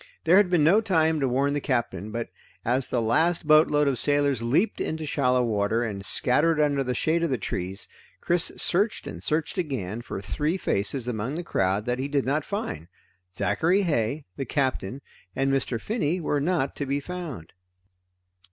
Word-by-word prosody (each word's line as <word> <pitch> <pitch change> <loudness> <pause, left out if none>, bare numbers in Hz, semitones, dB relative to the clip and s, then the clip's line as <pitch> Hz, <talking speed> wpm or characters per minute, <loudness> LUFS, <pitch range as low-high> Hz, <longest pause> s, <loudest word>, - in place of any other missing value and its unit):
There 175 +3 +5
had 200 -3 +4
been 175 -4 +3
no 185 +8 +5
time 160 -6 +2
to 135 - +1
warn 135 +3 +1
the 145 - -1
Captain, 115 -7 -2
but 115 +1 -4 0.4
as 125 +2 +1
the 125 - 0
last 160 +10 +1
boatload 150 -1 +5
of 130 -4 +2
sailors 145 -4 +2
leaped 140 - +1
into 160 0 -3
shallow 125 -3 +1
water 110 0 0
and 100 -4 -4
scattered 150 +10 +2
under 145 -2 +2
the 125 -1 -2
shade 160 +6 +1
of 170 - 0
the 130 - 0
trees, 95 -2 -4 0.3
Chris 175 -1 +1
searched 205 +5 +2
and - - -7
searched 160 +4 -1
again 120 - -3
for 115 - -6
three 150 - -2
faces 120 - -1
among 120 +4 -3
the 175 - -4
crowd 95 - 0
that 125 +1 -1
he 135 - -1
did 140 -1 0
not 145 +3 0
find. 145 - -4 0.5
Zachary 160 - +1
Heigh, 145 - -1
the 135 - -3
Captain, 130 -3 -2 0.3
and 135 0 +1
Mr. 130 -3 -1
Finney 180 - -1
were 150 -3 -1
not 155 -4 0
to 145 - -3
be 140 +1 0
found. 155 - -7
140 Hz, 180 wpm, -26 LUFS, 120-160 Hz, 0.5 s, There